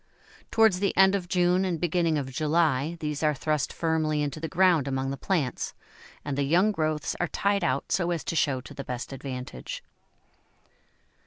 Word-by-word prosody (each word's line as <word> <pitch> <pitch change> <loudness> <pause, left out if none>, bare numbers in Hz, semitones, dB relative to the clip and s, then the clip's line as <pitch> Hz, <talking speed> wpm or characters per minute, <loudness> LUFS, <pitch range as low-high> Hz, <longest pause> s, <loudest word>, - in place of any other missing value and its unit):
Towards 220 -5 +4
the 200 0 0
end 190 0 +6
of 190 -3 -1
June 180 +1 +2
and 180 -4 -1
beginning 170 -2 +1
of 135 -2 -3
July 155 +1 +1
these 150 -2 -3
are 150 -1 +2
thrust 150 0 -1
firmly 155 -2 0
into 145 +1 -3
the 160 - -3
ground 175 -5 +3
among 135 0 -1
the - - -2
plants, 145 -5 -2 0.5
and 145 -2 -2
the 140 - 0
young 175 +9 +3
growths 155 -5 -1
are 175 - +1
tied 200 +1 0
out 135 -2 -1
so 175 -2 +1
as 170 -2 -1
to - - -3
show 140 -5 +1
to 125 - -11
the 140 - -6
best 125 +1 -5
advantage. 125 - -6
155 Hz, 180 wpm, -27 LUFS, 140-175 Hz, 0.5 s, end